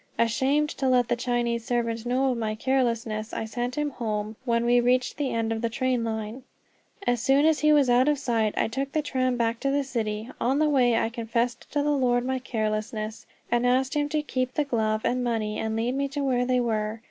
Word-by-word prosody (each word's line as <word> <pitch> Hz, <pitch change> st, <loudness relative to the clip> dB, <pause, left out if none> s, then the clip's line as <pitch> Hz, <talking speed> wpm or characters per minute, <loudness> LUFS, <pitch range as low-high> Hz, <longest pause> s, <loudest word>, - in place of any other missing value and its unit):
Ashamed 275 Hz, +6 st, +2 dB
to 265 Hz, -1 st, +1 dB
let 245 Hz, -2 st, +3 dB
the 240 Hz, -, +2 dB
Chinese 240 Hz, -1 st, -1 dB
servant 230 Hz, -1 st, -2 dB
know 260 Hz, +2 st, +2 dB
of 245 Hz, -, -2 dB
my 215 Hz, -1 st, -2 dB
carelessness, 230 Hz, -3 st, -1 dB
I -, -, -3 dB
sent 245 Hz, +3 st, -3 dB
him 295 Hz, -1 st, 0 dB
home 215 Hz, -3 st, -3 dB
when 235 Hz, -1 st, +1 dB
we 245 Hz, +1 st, +4 dB
reached 250 Hz, +1 st, +1 dB
the 285 Hz, -3 st, -1 dB
end 225 Hz, -1 st, -1 dB
of 225 Hz, -, -4 dB
the 230 Hz, -, 0 dB
tram 250 Hz, 0 st, 0 dB
line. 220 Hz, +2 st, -4 dB, 0.6 s
As 245 Hz, -2 st, +1 dB
soon 275 Hz, +4 st, +4 dB
as 315 Hz, -1 st, +3 dB
he 305 Hz, 0 st, +4 dB
was 290 Hz, -3 st, +5 dB
out 245 Hz, +2 st, +4 dB
of 295 Hz, -1 st, +3 dB
sight 230 Hz, -5 st, 0 dB
I -, -, +2 dB
took 270 Hz, +4 st, -4 dB
the 310 Hz, -, +1 dB
tram 255 Hz, -3 st, 0 dB
back 230 Hz, -1 st, 0 dB
to 275 Hz, -, 0 dB
the 280 Hz, +1 st, +1 dB
city. 225 Hz, -3 st, -3 dB
On 265 Hz, +3 st, +2 dB
the 305 Hz, 0 st, +3 dB
way 245 Hz, -5 st, +3 dB
I 225 Hz, -, +1 dB
confessed 235 Hz, +1 st, -2 dB
to 290 Hz, -1 st, +1 dB
the 295 Hz, -, +1 dB
Lord 245 Hz, -3 st, +2 dB
my 260 Hz, 0 st, -1 dB
carelessness, 215 Hz, -2 st, -3 dB, 0.2 s
and 240 Hz, 0 st, +2 dB
asked 260 Hz, +1 st, +2 dB
him 290 Hz, 0 st, 0 dB
to 305 Hz, 0 st, 0 dB
keep 255 Hz, -3 st, -2 dB
the 300 Hz, -, +1 dB
glove 220 Hz, -4 st, 0 dB
and 250 Hz, 0 st, +1 dB
money, 220 Hz, -3 st, -1 dB
and 220 Hz, 0 st, -2 dB
lead 230 Hz, +3 st, 0 dB
me 280 Hz, +1 st, 0 dB
to 280 Hz, +1 st, -4 dB
where 250 Hz, -2 st, +1 dB
they 255 Hz, -1 st, +2 dB
were. 220 Hz, -2 st, -1 dB
245 Hz, 230 wpm, -26 LUFS, 225-265 Hz, 0.6 s, was